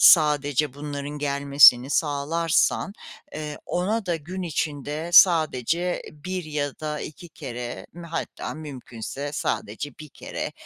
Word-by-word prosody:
sadece 145 -3 +5
bunların 145 0 -5
gelmesini 140 -2 +6
sağlarsan, 160 +6 +1 0.4
eee, 150 -1 -5
ona 200 +4 -1
da 175 -2 +1
gün 180 +5 -6
içinde 155 0 -3
sadece 170 0 +4
1 180 +4 -5
ya 145 -2 -3
da 150 -1 -3
2 170 +3 -8
kere 125 -6 -7
m 170 +1 -10
hatta 165 - -4
mümkünse 140 -2 -6
sadece 130 0 -3
1 155 - -9
kere, - - -6
150 Hz, 120 wpm, -25 LUFS, 140-165 Hz, 0.4 s, gelmesini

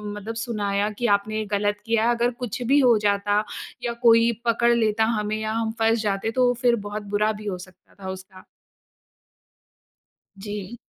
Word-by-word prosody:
मतलब 215 +2 -6
सुनाया 205 -2 -1
कि 240 - +1
आपने 215 +2 -4
गलत 205 0 0
किया। 230 0 +2
अगर 240 +1 +1
कुछ 240 +2 -5
भी 285 - +6
हो 245 -4 +5
जाता 205 +1 +1 0.4
या 235 - -1
कोई 230 0 +6
पकड़ 235 +1 +3
लेता 220 -1 +2
हमें 210 +1 -2
या 215 0 -2
हम 225 0 -1
फँस 225 0 +2
जाते 205 +1 -1
तो 250 +1 +3
फिर 245 -1 +4
बहुत 210 +1 -5
बुरा 210 +1 +2
भी - - -10
हो 190 -3 -2
सकता 185 0 -24
था 190 - -4
उसका। 185 0 -10 1.9
जी। 205 +2 -6
215 Hz, 165 wpm, -24 LUFS, 205-230 Hz, 1.9 s, भी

